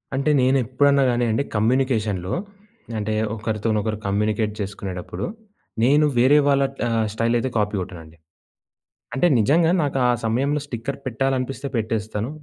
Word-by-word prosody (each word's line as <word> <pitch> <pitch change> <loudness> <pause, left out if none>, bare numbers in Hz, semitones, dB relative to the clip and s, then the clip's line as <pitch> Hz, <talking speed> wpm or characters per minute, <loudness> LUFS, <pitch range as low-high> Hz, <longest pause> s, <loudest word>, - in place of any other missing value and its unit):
అంటే 140 +3 0
నేనెప్పుడన్నా 135 +2 +3
గానీ 120 0 +1
అండి 115 +6 +1
కమ్యూనికేషన్‌లో 110 -5 0 0.6
అంటే 110 0 -2 0.2
ఒకరితోనొకరు 110 0 -1
కమ్యూనికేట్ 105 +2 0
జేసుకునేటప్పుడు, 95 -2 -5 0.6
నేను 145 +5 +5
వేరే 130 +5 +5
వాళ్ళ 140 -1 +3 0.3
ఆహ్, 115 -1 +1
స్టైల్ 115 +2 +1
అయితే 130 - -2
కాపీ 105 0 0
గొట్టనండి. 80 -3 -9 1.0
అంటే 175 - +3
నిజంగా 160 +9 +3
నాకా 135 -2 -1 0.2
సమయంలో 135 +6 +1
స్టిక్కర్ 130 0 -5
పెట్టాలనిపిస్తే 135 +2 -2
పెట్టేస్తాను. 110 0 -2
115 Hz, 115 wpm, -22 LUFS, 105-135 Hz, 1.0 s, నేను